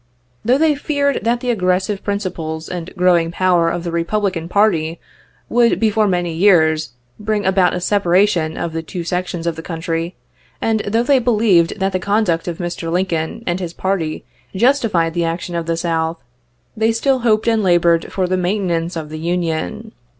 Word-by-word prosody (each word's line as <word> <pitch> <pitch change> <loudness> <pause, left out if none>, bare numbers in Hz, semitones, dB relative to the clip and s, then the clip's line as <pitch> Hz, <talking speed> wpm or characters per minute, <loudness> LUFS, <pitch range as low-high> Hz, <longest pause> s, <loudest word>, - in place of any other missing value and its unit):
Though 245 +4 +3
they 315 0 +3
feared 285 -1 0
that 235 +2 0
the 250 - 0
aggressive 190 -1 0
principles 170 -6 -3
and 175 -1 -5
growing 175 -2 +3
power 175 -1 +2
of 170 0 -3
the 170 - -3
Republican 170 0 -1
party 175 -6 +1 0.5
would, 235 -1 +3
before 220 -1 +2
many 175 -3 0
years, 160 - +3 0.3
bring 210 -1 -1
about 190 -1 +3
a - - -2
separation 180 -3 +2
of 165 - -3
the 165 - -2
two 170 +2 -6
sections 180 -1 -3
of 170 -1 -1
the - - -5
country, 165 +1 -4 0.4
and 225 -1 +1
though 225 +3 +1
they 270 +1 +4
believed 210 -7 +2
that 195 0 0
the 185 - -1
conduct 195 -4 0
of 170 -2 -3
Mr. 175 -2 -4
Lincoln 175 +2 -1
and 175 +1 -1
his 175 -2 -5
party 175 -5 -2 0.3
justified 210 - +2
the 170 0 0
action 170 +1 -3
of 170 -1 -3
the 165 0 0
South, 165 -1 -1 0.6
they 220 0 +2
still 260 +4 +1
hoped 220 -2 +1
and 225 -1 +3
labored 175 -3 +2
for 190 - 0
the 185 +1 0
maintenance 180 -2 -1
of 155 -2 -5
the 155 0 -6
Union. 175 +6 -2
180 Hz, 175 wpm, -18 LUFS, 165-210 Hz, 0.6 s, they